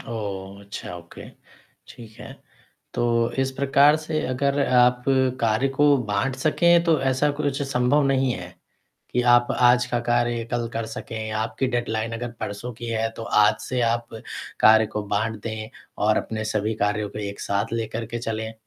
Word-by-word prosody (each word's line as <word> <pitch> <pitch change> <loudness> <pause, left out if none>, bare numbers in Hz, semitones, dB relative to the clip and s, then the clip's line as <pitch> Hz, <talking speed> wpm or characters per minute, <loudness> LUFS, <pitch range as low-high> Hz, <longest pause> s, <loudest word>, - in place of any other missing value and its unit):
ओह! 100 -3 -6
अच्छा 100 -3 -7
ओके 85 0 -12 0.6
ठीक 115 -2 -12
है। - - -9 0.6
तो - - 0 0.3
इस 135 0 +1
प्रकार 140 +2 +4
से 155 0 -3
अगर 140 +2 0
आप 125 0 +4 0.4
कार्य 115 +4 +2
को 145 +1 +4
बाँट 115 +6 -1
सकें 170 +4 +3
तो 165 -2 +3
ऐसा 130 +3 +2
कुछ 140 -1 -1
संभव 135 +1 +2
नहीं 135 -2 +2
है 90 -4 -8 0.6
कि 125 - +2
आप 120 0 +5
आज 125 0 +4
का 125 -1 -1
कार्य 120 -1 +1
कल 120 -1 -1
कर 115 - -2
सकें 110 -1 -6
आपकी 110 +4 -2
डेडलाइन 115 -2 -2
अगर 120 +1 -4
परसों 105 +5 -5
की 120 +2 -9
है 115 0 0
तो 115 - -5 0.2
आज 105 - +4
से 125 -1 -2
आप 115 0 -1 0.5
कार्य 110 0 +6
को 105 - -1
बाँट 110 +2 -1
दें 110 -1 -5 0.4
और 110 - +3
अपने 110 0 -3
सभी 110 0 -1
कार्यों 105 0 -1
को 105 - -7
एक 100 -1 -5
साथ 100 +2 -1
लेकर 115 0 -3
के 120 +2 -5
चलें? 110 -1 -4
120 Hz, 170 wpm, -24 LUFS, 110-130 Hz, 0.6 s, कार्य